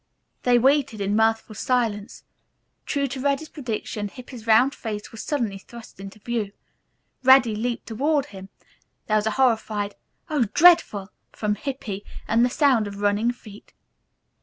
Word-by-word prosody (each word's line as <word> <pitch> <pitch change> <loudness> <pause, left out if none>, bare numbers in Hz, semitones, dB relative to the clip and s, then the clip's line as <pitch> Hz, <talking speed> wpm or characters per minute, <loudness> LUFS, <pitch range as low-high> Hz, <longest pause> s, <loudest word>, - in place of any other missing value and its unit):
They 245 -1 +4
waited 270 -2 +2
in 200 +1 0
mirthful 220 0 +1
silence. 225 -2 -2 0.6
True 280 -1 0
to 265 0 -5
Reddy's 280 +3 -1
prediction 220 -5 -4
Hippy's 245 +1 -11
round 240 +5 +5
face 210 -5 -6
was 225 - -8
suddenly 230 -10 -2
thrust 235 0 -13
into 195 +2 -9
view. 215 -2 -3 0.7
Reddy 260 -4 +6
leaped 235 +2 -3
toward 280 +5 0
him. 195 -6 -11 0.6
There 215 - +2
was 210 0 0
a 220 - -2
horrified, 220 -5 +1 0.3
"Oh, 295 -7 +1
dreadful!" 260 - +5 0.2
from 210 -1 -1
Hippy, 210 -5 -5 0.2
and 230 +2 +3
the 250 - +3
sound 255 -6 +2
of 200 0 -8
running 205 +3 +1
feet. 215 -4 -14
225 Hz, 145 wpm, -24 LUFS, 210-260 Hz, 0.7 s, Reddy